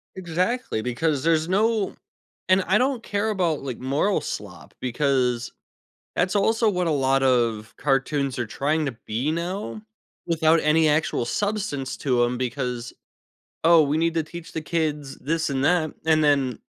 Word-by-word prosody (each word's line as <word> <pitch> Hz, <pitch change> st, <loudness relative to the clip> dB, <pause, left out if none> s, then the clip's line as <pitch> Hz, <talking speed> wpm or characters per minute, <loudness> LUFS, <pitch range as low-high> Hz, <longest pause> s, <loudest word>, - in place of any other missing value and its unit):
Exactly, 185 Hz, -, -1 dB
because 135 Hz, +4 st, -1 dB
there's 160 Hz, -1 st, +2 dB
no 210 Hz, +1 st, +1 dB, 0.5 s
and 185 Hz, +1 st, +5 dB
I 190 Hz, +4 st, +3 dB
don't 255 Hz, -1 st, 0 dB
care 205 Hz, +1 st, -1 dB
about, 175 Hz, -7 st, 0 dB
like, 130 Hz, -3 st, -5 dB
moral 140 Hz, +10 st, +1 dB
slop, 90 Hz, -5 st, -7 dB
because 125 Hz, -2 st, 0 dB, 0.6 s
that's 185 Hz, +3 st, +1 dB
also 225 Hz, +2 st, +3 dB
what 180 Hz, -2 st, -1 dB
a -, -, +1 dB
lot 135 Hz, -1 st, +2 dB
of 115 Hz, -4 st, +1 dB
cartoons 135 Hz, -1 st, 0 dB
are 120 Hz, -, -1 dB
trying 150 Hz, +7 st, -1 dB
to 135 Hz, -, -2 dB
be 125 Hz, +8 st, -1 dB
now 185 Hz, +6 st, -4 dB, 0.4 s
without 165 Hz, -1 st, +3 dB
any 155 Hz, +1 st, +4 dB
actual 150 Hz, -5 st, +1 dB
substance 195 Hz, -, -2 dB
to 125 Hz, -3 st, +2 dB
'em, 120 Hz, 0 st, -1 dB
because 125 Hz, -1 st, -3 dB, 0.7 s
"Oh, 165 Hz, -1 st, +7 dB
we 145 Hz, +1 st, 0 dB
need 165 Hz, +1 st, +2 dB
to 165 Hz, -, +1 dB
teach 170 Hz, +2 st, -10 dB
the 160 Hz, -, -3 dB
kids 150 Hz, -4 st, -2 dB
this 165 Hz, +3 st, -1 dB
and 135 Hz, -1 st, -1 dB
that." 160 Hz, 0 st, +2 dB
And 155 Hz, -1 st, +4 dB
then, 140 Hz, -5 st, +2 dB
155 Hz, 160 wpm, -24 LUFS, 130-175 Hz, 0.7 s, Oh